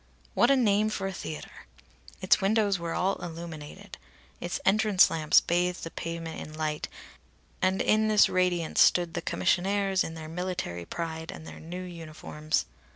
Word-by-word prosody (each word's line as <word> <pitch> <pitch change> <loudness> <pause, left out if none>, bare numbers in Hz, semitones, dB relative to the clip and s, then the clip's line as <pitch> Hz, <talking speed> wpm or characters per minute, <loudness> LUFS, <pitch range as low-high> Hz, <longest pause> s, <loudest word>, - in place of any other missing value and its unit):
(What 240 - +4
a 275 - +6
name 215 -4 +3
for 200 -2 -3
a 195 - -3
theatre!) 155 - -8 0.5
Its 185 +2 +4
windows 200 -1 +2
were 170 -1 -3
all 195 +2 +1
illuminated. 170 +3 -8 0.4
Its 175 +1 -3
entrance 210 -1 +5
lamps 155 -2 +4
bathed 175 +1 0
the 165 - -5
pavement 165 -1 -5
in 155 - -9
light, 155 -1 -2 0.7
and 190 +1 +2
in 215 0 +3
this 215 -1 +6
radiance 180 -3 +1
stood 175 -2 +4
the - - -2
commissionaires 190 - +1
in 160 - -6
their 160 -1 -7
military 165 - -4
pride 160 - -5
and 160 - -10
their - - -10
new 175 +3 -7
uniforms. 155 -3 -3
175 Hz, 155 wpm, -28 LUFS, 160-195 Hz, 0.7 s, a